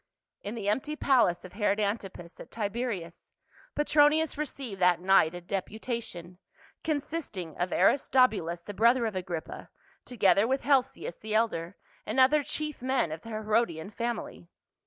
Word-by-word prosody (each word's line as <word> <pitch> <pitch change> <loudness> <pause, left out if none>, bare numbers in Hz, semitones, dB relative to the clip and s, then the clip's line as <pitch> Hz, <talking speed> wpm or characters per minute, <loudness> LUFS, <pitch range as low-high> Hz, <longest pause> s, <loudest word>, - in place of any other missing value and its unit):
In 205 +3 -5
the 210 -3 -5
empty 265 +9 0
palace 245 - +2
of 185 - -11
Herod 205 0 +1
Antipas 200 -4 -4
at - - -10
Tiberias, 205 -5 -4 0.4
Petronius 295 +1 +3
received 270 -9 -5
that 180 -1 +4
night 180 -3 +4
a 175 - -6
deputation, 190 -2 -5 0.4
consisting 285 - -3
of 180 0 -1
Aristobulus 195 - +2
the 205 - -7
brother 235 +4 +3
of 220 -3 -3
Agrippa, 175 -3 -5 0.3
together 210 -3 +3
with 265 +2 0
Helcias 265 -9 +1
the 215 0 -4
elder, 200 -6 0 0.3
and 220 +5 -2
other 280 +4 +5
chief 300 0 -5
men 260 -10 0
of 155 +1 -6
the 230 - -11
Herodian 215 -5 -1
family. 230 -6 -5
215 Hz, 140 wpm, -29 LUFS, 180-260 Hz, 0.4 s, other